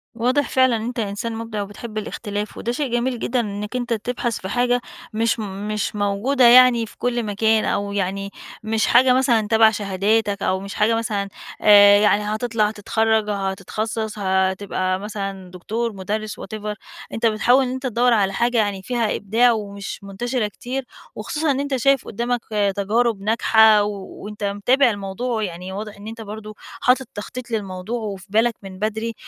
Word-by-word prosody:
واضح 255 Hz, +5 st, +1 dB
فعلًا 260 Hz, -2 st, +3 dB
إن 220 Hz, -, -3 dB
أنت 240 Hz, 0 st, -4 dB
إنسان 220 Hz, +2 st, -3 dB
مبدع، 225 Hz, -2 st, -4 dB
وبتحب 215 Hz, +2 st, -7 dB
الاختلاف، 210 Hz, -1 st, -4 dB
وده 235 Hz, -, -2 dB
شيء 270 Hz, 0 st, -2 dB
جميل 240 Hz, 0 st, 0 dB
جدًا، 245 Hz, +2 st, 0 dB
إنك 210 Hz, +1 st, -4 dB
أنت 245 Hz, -1 st, -1 dB
تبحث 235 Hz, +1 st, -2 dB
في 190 Hz, -, -6 dB
حاجة 245 Hz, 0 st, +1 dB, 0.3 s
مش 230 Hz, +2 st, +1 dB
مش 210 Hz, +1 st, -3 dB
موجودة 210 Hz, +6 st, +2 dB
يعني 245 Hz, -1 st, +7 dB
في -, -, -16 dB
كل 240 Hz, -1 st, -1 dB
مكان، 220 Hz, +1 st, +1 dB
أو 200 Hz, 0 st, -1 dB
يعني 195 Hz, 0 st, -2 dB, 0.3 s
مش 220 Hz, 0 st, 0 dB
حاجة 255 Hz, +1 st, +5 dB
مثلًا 240 Hz, -5 st, +2 dB
تبع 220 Hz, 0 st, +5 dB
شهاداتك، 205 Hz, 0 st, 0 dB
أو 190 Hz, -, +1 dB
مش 195 Hz, +1 st, -7 dB
حاجة 220 Hz, +2 st, +2 dB
مثلًا 210 Hz, -3 st, -2 dB, 0.3 s
آآ 205 Hz, -1 st, +8 dB
يعني 210 Hz, 0 st, +3 dB
هتطلع، 215 Hz, 0 st, 0 dB
هتتخرج، 220 Hz, 0 st, 0 dB
هتتخصص، 210 Hz, +2 st, -3 dB
هتبقى 190 Hz, -1 st, 0 dB
مثلًا 195 Hz, -3 st, -6 dB
دكتور، 220 Hz, +5 st, -3 dB
مدرس، 210 Hz, +3 st, -4 dB
whatever، 210 Hz, 0 st, -5 dB, 0.4 s
أنت 225 Hz, -, -1 dB
بتحاول 230 Hz, +4 st, +4 dB
إن 250 Hz, -, -3 dB
أنت 260 Hz, +1 st, -5 dB
تدور 245 Hz, +1 st, +2 dB
على 195 Hz, -3 st, +2 dB
حاجة 235 Hz, +3 st, +1 dB
يعني 205 Hz, -3 st, 0 dB
فيها 235 Hz, 0 st, -1 dB
إبداع، 230 Hz, +5 st, +3 dB
ومش 200 Hz, -3 st, -5 dB
منتشرة 220 Hz, +3 st, -2 dB
كتير، 260 Hz, +4 st, -5 dB, 0.3 s
وخصوصًا 305 Hz, 0 st, -1 dB
إن 270 Hz, -, -1 dB
أنت 280 Hz, -1 st, -1 dB
شايف 275 Hz, +1 st, +2 dB
قدامك 240 Hz, +2 st, -2 dB, 0.3 s
تجارب 215 Hz, +1 st, +1 dB
ناجحة، 220 Hz, 0 st, +5 dB
وأنت 205 Hz, +1 st, -7 dB
متابع 240 Hz, +7 st, +3 dB
الموضوع 215 Hz, +3 st, -3 dB
يعني 180 Hz, 0 st, -5 dB
واضح 210 Hz, +2 st, -6 dB
إن 205 Hz, -, -10 dB
أنت 225 Hz, +1 st, -7 dB
برضو 215 Hz, 0 st, -8 dB, 0.3 s
حاطط 255 Hz, 0 st, +3 dB
تخطيط 240 Hz, +4 st, -7 dB
للموضوع 205 Hz, +1 st, -3 dB
وفي 200 Hz, -4 st, -6 dB
بالك 225 Hz, +3 st, +2 dB
من 190 Hz, -1 st, -9 dB
بدري، 220 Hz, +2 st, -2 dB
215 Hz, 165 wpm, -21 LUFS, 200-235 Hz, 0.4 s, آآ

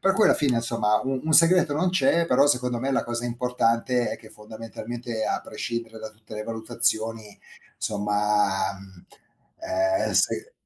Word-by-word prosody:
Per 195 Hz, -, +3 dB
cui 215 Hz, -, +3 dB
alla -, -, +5 dB
fine, 135 Hz, -5 st, +1 dB
insomma, 115 Hz, -2 st, +1 dB
un 130 Hz, 0 st, -2 dB
un 160 Hz, -, 0 dB
segreto 165 Hz, 0 st, +5 dB
non 160 Hz, +6 st, +1 dB
c'è, 170 Hz, -1 st, +2 dB
però 140 Hz, 0 st, +4 dB
secondo 125 Hz, -3 st, 0 dB
me, 135 Hz, +2 st, -2 dB
la -, -, +1 dB
cosa 120 Hz, 0 st, -4 dB
importante 120 Hz, 0 st, 0 dB
è -, -, -4 dB
che 110 Hz, -1 st, -15 dB
fondamentalmente, 110 Hz, +1 st, -7 dB
a -, -, -1 dB
prescindere 115 Hz, -1 st, -6 dB
da 110 Hz, -, -8 dB
tutte 110 Hz, 0 st, -14 dB
le 105 Hz, -, -4 dB
valutazioni 110 Hz, -1 st, -2 dB, 0.4 s
somma, 105 Hz, -2 st, 0 dB
mhmm, 95 Hz, -2 st, -16 dB, 0.6 s
ehm, 330 Hz, 0 st, 0 dB
se -, -, +1 dB
115 Hz, 165 wpm, -25 LUFS, 110-135 Hz, 0.6 s, alla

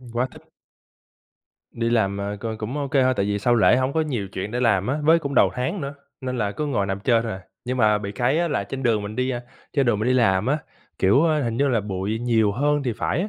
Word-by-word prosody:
Ừm, 125 Hz, -2 st, -13 dB
quá 120 Hz, +2 st, 0 dB
thích! -, -, -15 dB, 1.3 s
Đi 115 Hz, 0 st, -1 dB
làm, 100 Hz, -4 st, +1 dB
ờ, 100 Hz, +1 st, -3 dB
c 105 Hz, -, -14 dB
cũng 115 Hz, +6 st, -4 dB
ô 140 Hz, -2 st, -2 dB
kê 140 Hz, -2 st, +3 dB
thôi, 130 Hz, 0 st, +3 dB
tại 100 Hz, -, +1 dB
vì 105 Hz, 0 st, 0 dB
sau 120 Hz, +3 st, +2 dB
lễ 120 Hz, +2 st, +5 dB
hổng 130 Hz, +1 st, 0 dB
có 160 Hz, -, +1 dB
nhiều 125 Hz, -11 st, -2 dB
chuyện 95 Hz, +2 st, -4 dB
để 125 Hz, +2 st, -2 dB
làm 105 Hz, -5 st, +2 dB
á, 140 Hz, +4 st, 0 dB
với 165 Hz, +2 st, +6 dB
cũng 140 Hz, -3 st, -4 dB
đầu -, -, +5 dB
tháng 130 Hz, +9 st, -2 dB
nữa, 140 Hz, 0 st, -5 dB, 0.3 s
nên 125 Hz, -1 st, -3 dB
là 105 Hz, -2 st, -1 dB
cứ 150 Hz, +5 st, -3 dB
ngồi 110 Hz, -8 st, 0 dB
nằm 95 Hz, 0 st, -3 dB
chơi 115 Hz, +2 st, +2 dB
thôi 115 Hz, -1 st, -3 dB
à. 95 Hz, -, -7 dB, 0.2 s
Nhưng 125 Hz, +1 st, -2 dB
mà 105 Hz, -3 st, +3 dB
bị 100 Hz, 0 st, -5 dB
cái 125 Hz, +8 st, +1 dB
á 170 Hz, -1 st, +1 dB
là 120 Hz, -9 st, -1 dB
trên 135 Hz, +6 st, -6 dB
đường 115 Hz, -4 st, +2 dB
mình 105 Hz, +1 st, -6 dB
đi, 130 Hz, +1 st, 0 dB
a, 120 Hz, -, -3 dB, 0.3 s
trên 140 Hz, -3 st, +1 dB
đường 110 Hz, -4 st, +2 dB
mình 110 Hz, -, 0 dB
đi 130 Hz, -, +3 dB
làm 105 Hz, -5 st, +3 dB
á, 145 Hz, +4 st, +1 dB, 0.4 s
kiểu, 130 Hz, -, +4 dB
á, 155 Hz, -2 st, +2 dB
hình 115 Hz, -1 st, -2 dB
như 140 Hz, +2 st, +2 dB
là 120 Hz, -5 st, +2 dB
bụi 100 Hz, +2 st, -3 dB
nhiều 115 Hz, -3 st, +2 dB
hơn 145 Hz, +4 st, +1 dB
thì 125 Hz, -4 st, -1 dB
phải 165 Hz, -, -1 dB
á. 205 Hz, -, -2 dB
120 Hz, 285 wpm, -23 LUFS, 105-135 Hz, 1.3 s, với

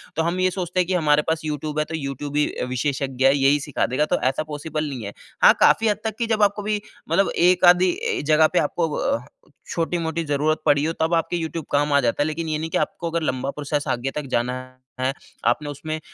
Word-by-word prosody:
तो 160 Hz, -, +1 dB
हम 170 Hz, +2 st, -1 dB
ये 185 Hz, 0 st, +3 dB
सोचते 180 Hz, 0 st, -3 dB
हैं 180 Hz, -, +2 dB
कि 185 Hz, -, 0 dB
हमारे 150 Hz, -4 st, +3 dB
पास 160 Hz, 0 st, 0 dB
यूट्यूब 150 Hz, 0 st, -3 dB
है 150 Hz, -, +1 dB
तो 160 Hz, -, -5 dB
यूट्यूब 140 Hz, 0 st, -5 dB
ही 150 Hz, -, +4 dB
अ, -, -, -4 dB
विशेषज्ञ 130 Hz, 0 st, -1 dB
है 135 Hz, +1 st, +6 dB
यही 140 Hz, +2 st, +4 dB
सिखा 145 Hz, -1 st, -1 dB
देगा, 140 Hz, +5 st, 0 dB
तो -, -, 0 dB
ऐसा 135 Hz, -, -2 dB
पॉसिबल 155 Hz, 0 st, -4 dB
नहीं 125 Hz, -5 st, -6 dB
है। 100 Hz, -, -6 dB, 0.3 s
हाँ -, -, +9 dB
काफ़ी 225 Hz, -, +5 dB
हद 210 Hz, -, +2 dB
तक 220 Hz, -1 st, -3 dB
कि 235 Hz, -, 0 dB
जब 215 Hz, -2 st, +2 dB
आप 200 Hz, 0 st, +4 dB
कभी 210 Hz, 0 st, -1 dB, 0.3 s
मतलब 195 Hz, -, +3 dB
एक-आधी 180 Hz, +1 st, +5 dB
ए, -, -, -1 dB
जगह 155 Hz, +1 st, +5 dB
पे -, -, +4 dB
आपको 165 Hz, -2 st, 0 dB
व 280 Hz, +1 st, -1 dB, 0.5 s
छोटी-मोटी 165 Hz, -1 st, -1 dB
ज़रूरत 150 Hz, +2 st, 0 dB
पड़ी 145 Hz, 0 st, +4 dB
हो 160 Hz, -, 0 dB
तब 160 Hz, +2 st, +1 dB
आपके 165 Hz, +1 st, +1 dB
यूट्यूब 160 Hz, -1 st, -4 dB
काम 145 Hz, 0 st, +2 dB
आ 140 Hz, -, +5 dB
जाता 120 Hz, +4 st, 0 dB
है। -, -, -1 dB
लेकिन 160 Hz, +1 st, -3 dB
ये 155 Hz, -, 0 dB
नहीं 160 Hz, +1 st, -4 dB
कि -, -, 0 dB
आपको 170 Hz, -, -2 dB
अगर 170 Hz, 0 st, -1 dB
लंबा 130 Hz, -1 st, -1 dB
प्रोसेस 145 Hz, 0 st, -3 dB
आगे 130 Hz, +2 st, -1 dB
तक 150 Hz, -, -3 dB
जाना 120 Hz, +1 st, 0 dB, 0.5 s
है, 130 Hz, +1 st, 0 dB, 0.3 s
आपने 145 Hz, +5 st, +1 dB
उसमें 155 Hz, +2 st, -5 dB
155 Hz, 240 wpm, -23 LUFS, 145-170 Hz, 0.5 s, हाँ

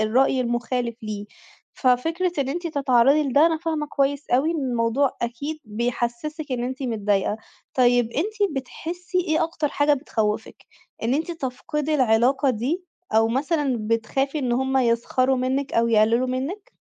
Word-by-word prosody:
الرأي 255 Hz, +4 st, +3 dB
المخالف 240 Hz, -1 st, -1 dB
ليه. 210 Hz, -1 st, -5 dB, 0.5 s
ففكرة 325 Hz, +8 st, +1 dB
إن 275 Hz, -2 st, 0 dB
أنتِ 345 Hz, +5 st, -3 dB
تتعرّضي 275 Hz, -1 st, +3 dB
لده 285 Hz, +2 st, +4 dB
أنا 325 Hz, -1 st, +1 dB
فاهمة 315 Hz, -2 st, -2 dB
كويس 285 Hz, 0 st, -1 dB
أوي 265 Hz, +6 st, +3 dB
إن 335 Hz, -, -1 dB
الموضوع 240 Hz, +3 st, +1 dB
أكيد 280 Hz, +7 st, -3 dB
بيحسسِك 240 Hz, +6 st, -3 dB
إن 240 Hz, -1 st, -1 dB
أنتِ 260 Hz, +2 st, -4 dB
متضايقة. 210 Hz, -4 st, 0 dB, 0.4 s
طيب 245 Hz, -2 st, +3 dB
أنتِ 405 Hz, -, -1 dB
بتحسي 350 Hz, +7 st, -4 dB
إيه 330 Hz, -2 st, +1 dB
أكتر 320 Hz, -2 st, -2 dB
حاجة 290 Hz, +1 st, +2 dB
بتخوّفك؟ 220 Hz, -7 st, -3 dB, 0.4 s
إن 235 Hz, +3 st, +1 dB
أنتِ 320 Hz, +4 st, -1 dB
تفقدي 300 Hz, 0 st, -3 dB
العلاقة 260 Hz, +2 st, +3 dB
دي؟ 265 Hz, -, -2 dB, 0.3 s
أو 225 Hz, 0 st, +4 dB
مثلًا 280 Hz, +1 st, 0 dB
بتخافي 235 Hz, +6 st, -1 dB
إن 255 Hz, -4 st, -1 dB
هُم 265 Hz, +2 st, +1 dB
يسخَروا 255 Hz, +2 st, +2 dB
منِك 260 Hz, +2 st, -1 dB
أو 230 Hz, 0 st, +3 dB
يقللوا 230 Hz, +3 st, +3 dB
منِك؟ 320 Hz, -, -4 dB
265 Hz, 145 wpm, -23 LUFS, 235-300 Hz, 0.5 s, لده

